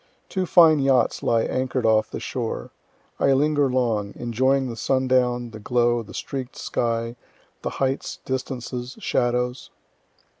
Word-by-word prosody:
Two 185 -2 -1
fine 160 -3 +6
yachts 135 -3 +2
lie 115 -1 +2
anchor'd 130 -1 -1
off 110 -1 +3
the - - -5
shore. 120 -4 -4 0.5
I 140 - +4
linger 145 0 +2
long, 115 -5 0
enjoying 130 +3 +1
the 120 - -5
sundown, 125 -1 +1
the 110 - -9
glow, 120 +1 +1
the 110 - -11
streak'd 135 -1 -5
sky, 115 0 -2 0.5
the - - -2
heights, 135 0 -1
distances, 130 -1 -4
shadows. 125 +1 -1
125 Hz, 135 wpm, -24 LUFS, 120-135 Hz, 0.5 s, fine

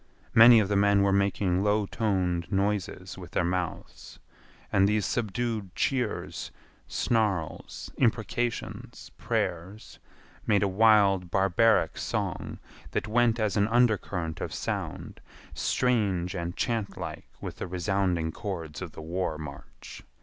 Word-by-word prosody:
Many 115 +1 +9
of 105 - +1
the 105 - 0
men 100 0 +4
were 100 - +3
making 100 -2 +1
low 105 0 +2
toned 95 -5 -1
noises 95 -2 -2
with 90 - -11
their - - +1
mouths, 90 0 -4 0.6
and 95 +1 +4
these 105 -1 +1
subdued 110 -3 -2
cheers, 125 -5 -2 0.4
snarls, 105 -8 -1
imprecations, 120 0 -2
prayers, 90 +6 -3 0.5
made 100 -2 +3
a - - +3
wild, 100 -2 +4
barbaric 95 +5 +3
song - - -3 0.4
that - - -1
went 120 +1 +2
as 110 -2 0
an 100 0 +3
undercurrent 105 -8 +1
of - - -4
sound, - - -4 0.3
strange 100 -8 0
and 85 -2 -4
chantlike 115 -4 -3
with - - -7
the - - -5
resounding 90 -2 0
chords 85 -7 -6
of 90 -4 -6
the 80 - -9
war 85 -1 -2
march. 75 -3 -10
100 Hz, 125 wpm, -28 LUFS, 90-110 Hz, 0.6 s, Many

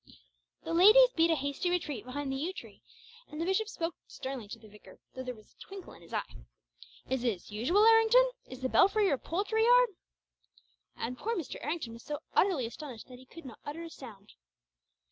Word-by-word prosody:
The - - -4
ladies 430 +9 +7
beat 330 0 +4
a 325 - +4
hasty 285 +5 -2
retreat 300 - -2
behind 275 +2 -4
the - - -2
yew 320 +8 -3
tree, - - -11 0.5
and 300 - -8
the 330 - -1
bishop 385 +4 0
spoke 335 -5 -3
sternly 260 -5 -6
to 220 - -8
the 220 -1 -16
vicar, 210 0 -16 0.2
though 260 - -6
there 250 -1 -5
was 215 -1 -19
a - - -47
twinkle 390 -1 -10
in - - -16
his - - -17
eye. - - -3 0.7
"Is 265 -1 -1
this 220 -6 -2
usual, 325 - +3
Errington? 455 +3 +6 0.2
Is 255 0 -10
the 260 - 0
belfry 405 +9 +4
your 280 -9 +1
poultry 415 +6 -1
yard?" - - +6 1.1
And 250 +2 -4
poor 460 +2 -2
Mr. 335 - -6
Errington 295 -6 -3
was 230 - -11
so 295 +3 -4 0.2
utterly 355 -11 +2
astonished 245 0 -9
that 250 -1 -11
he 260 - -17
could 335 +3 -13
not 240 -5 -10
utter 300 +4 -6
a 330 - -9
sound. 210 -8 -12
300 Hz, 200 wpm, -31 LUFS, 250-385 Hz, 1.1 s, ladies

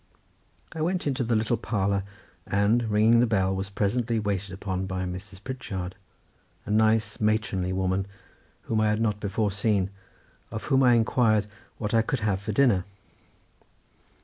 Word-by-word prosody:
I 160 - -5
went 175 +3 0
into 135 -2 0
the 115 0 +1
little 110 +2 +1
parlour, 100 -2 0 0.5
and, 110 +4 +2
ringing 110 +3 +5
the 120 - +4
bell, 95 -3 +1
was 95 +1 -3
presently 115 +4 0
waited 100 -2 -2
upon 95 0 -3
by 95 -1 -3
Mrs. 95 +2 -8
Pritchard, 95 -9 -5 0.7
a - - -4
nice 110 0 +2
matronly 105 -4 0
woman, 95 +1 0 0.6
whom 110 -1 0
I 110 - +3
had 105 0 +1
not 105 -2 0
before 105 +1 -1
seen, 100 -1 0 0.6
of 110 - -5
whom 135 -2 +2
I 125 -2 +6
inquired 110 -2 +3 0.3
what 105 -1 -3
I 115 - +5
could 115 +2 -2
have 100 -3 0
for 110 - -3
dinner. 105 -5 +3
105 Hz, 155 wpm, -26 LUFS, 95-115 Hz, 0.7 s, I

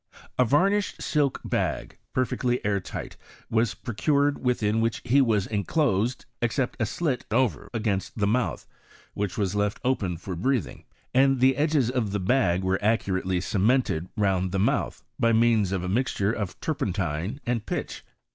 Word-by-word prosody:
A - - +7
varnished 195 - +2
silk 145 -3 +1
bag, - - -2
perfectly 125 -1 0
air 100 -1 +2
tight, - - -7 0.3
was 115 0 +1
pro 120 - -6
cured, 140 +4 +1
within 115 -3 +1
which 115 0 0
he 135 +4 +4
was 110 -6 +2
enclosed, 115 - 0 0.2
except 120 +2 0
a 110 - +2
slit 135 +2 -1
over 115 - 0
against 105 -4 -2
the 105 - +1
mouth, 120 +5 0 0.5
which 105 +2 -3
was 100 -3 0
left 105 0 0
open 100 -9 0
foi 90 +3 -6
breathing; 110 - -1 0.3
and 135 +1 +4
the 130 +1 +5
edges 145 -4 +2
ofthe 105 -7 -1
bag 95 -6 +2
were 95 +1 +1
accurately 95 -4 +1
cemented 95 -3 +1
round 95 -3 +1
the 100 - -1
mouth, 100 - 0 0.2
by 115 0 +3
means 110 -4 +3
of 95 -2 -1
a - - -3
mixture 105 -1 0
of 100 -6 -4
turpentine 100 - -2
and 120 -3 -1
pitch. - - -4
110 Hz, 155 wpm, -26 LUFS, 100-130 Hz, 0.5 s, A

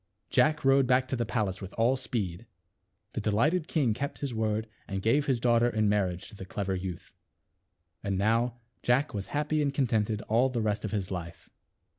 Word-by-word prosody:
Jack 155 -2 +3
rowed 135 -1 +5
back 130 0 +3
to - - 0
the 120 -2 -1
palace 105 -5 -1
with 95 -1 -8
all 120 +3 +3
speed. 115 -6 -3 0.7
The - - -2
delighted 150 - +2
king 135 -9 +2
kept 140 +6 -4
his 140 -4 -3
word 110 0 -1 0.2
and 95 -1 -3
gave 120 +9 +2
his 130 -4 +2
daughter 120 0 +3
in 110 -3 +1
marriage 100 -2 0
to 110 - -11
the 95 - -8
clever 95 +1 -3
youth. 90 -2 -5 0.9
And 100 -2 -1
now 115 +4 +2 0.3
Jack 130 +5 +2
was 100 -2 -4
happy 150 +1 0
and 140 -1 +1
contented 110 -6 0
all 120 +4 +3
the 125 -2 -2
rest 105 -1 0
of 110 - -2
his 100 -4 -2
life. 85 -2 -7
115 Hz, 190 wpm, -29 LUFS, 100-130 Hz, 0.9 s, rowed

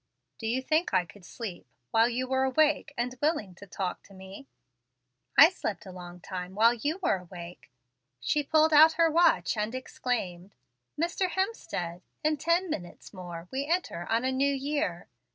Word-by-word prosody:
"Do 225 - -4
you 255 +3 0
think 310 - +1
I 180 -1 +3
could 180 +3 -16
sleep 200 -2 -7 0.2
while 225 +1 +4
you 255 +2 -2
were 265 0 +1
awake 295 +3 +2
and 245 +1 -1
willing 290 - 0
to 200 +3 -13
talk 185 -1 -4
to 195 - -16
me?" 190 +8 -11 0.9
"I 320 +5 +10
slept 215 - -4
a 190 - -9
long 180 -1 -10
time 180 0 -6
while 230 +3 +5
you 290 - -2
were 195 - +2
awake." 175 -3 -11 0.5
She 295 - +1
pulled 315 +2 +3
out 315 +2 +8
her 330 0 +3
watch, 305 - +3
and 215 +3 -2
exclaimed: 205 -8 -4 0.4
"Mr. 350 +3 0
Hemstead! 350 - -3 0.2
in 305 0 +2
ten 335 +5 +1
minutes 185 - -7
more 175 -2 -8
we 275 +2 -2
enter 325 - -1
on 230 +3 +1
a 260 - +1
new 275 +2 +2
year." 275 - -2
240 Hz, 170 wpm, -28 LUFS, 185-300 Hz, 0.9 s, I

